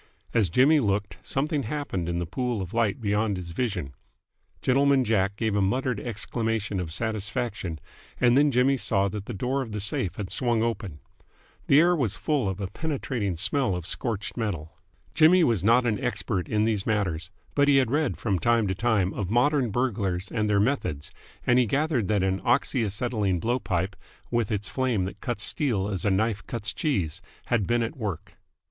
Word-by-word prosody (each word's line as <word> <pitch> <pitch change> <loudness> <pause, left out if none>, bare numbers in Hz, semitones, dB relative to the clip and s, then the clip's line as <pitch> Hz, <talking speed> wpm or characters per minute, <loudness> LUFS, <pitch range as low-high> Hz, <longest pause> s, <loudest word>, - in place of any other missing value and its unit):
As 105 -6 +3
Jimmy 140 - +5
looked, 100 -5 -1
something 145 +2 -1
happened 110 - -3
in 85 - -1
the 85 - -1
pool 120 +5 -2
of 95 -2 -5
light 115 +1 +1
beyond 105 -2 0
his 85 -2 -6
vision. 90 - -2 0.7
Gentleman 135 +1 +4
Jack 100 -3 +1
gave 110 -1 -1
a 100 - +2
muttered 125 +3 0
exclamation 110 -3 -2
of 85 -3 -4
satisfaction, 105 -3 -2 0.4
and 120 -1 +4
then 145 +2 +5
Jimmy 135 +1 +3
saw 100 -5 +1
that 100 +1 -6
the 120 - -4
door 130 +7 -1
of 115 -5 -6
the 105 - -2
safe 100 -2 0
had 100 -3 -5
swung 120 -3 +1
open. 105 -10 -3 0.7
The 140 - +6
air 175 +2 +5
was 120 - 0
full 130 -3 0
of 95 0 -4
a 100 - -2
penetrating 120 - -3
smell 130 - +1
of 90 -2 -5
scorched 110 +1 -3
metal. 90 -10 -4 0.4
Jimmy 175 +3 +6
was 115 - +2
not 120 +4 +4
an 120 +3 0
expert 105 -7 -1
in 105 -1 +2
these 110 -3 0
matters, 90 -7 -1 0.2
but 145 0 +3
he 140 -1 +5
had 130 -3 +2
read 150 -1 +1
from 100 -6 -1
time 115 +4 +2
to - - +1
time 105 -3 +1
of 95 -4 -3
modern 125 +3 +2
burglars 100 -6 -1
and 105 -2 0
their 100 -1 +3
methods, 100 - -1 0.3
and 125 +1 +4
he 125 - +3
gathered 140 - +1
that 105 -3 +1
an 95 0 0
oxy 120 0 +2
acetylene 105 -3 -1
blow 120 +7 0
pipe, 95 -2 -2 0.4
with 120 -3 0
its 105 -1 -1
flame 125 -8 0
that 95 +1 -8
cuts 120 - -2
steel 115 - 0
as 95 -4 -2
a - - +4
knife 105 +2 0
cuts 110 -3 -2
cheese, 95 - -1 0.3
had 115 -6 +1
been 120 0 +2
at 115 +7 -4
work. 105 - -5
110 Hz, 190 wpm, -26 LUFS, 95-125 Hz, 0.7 s, The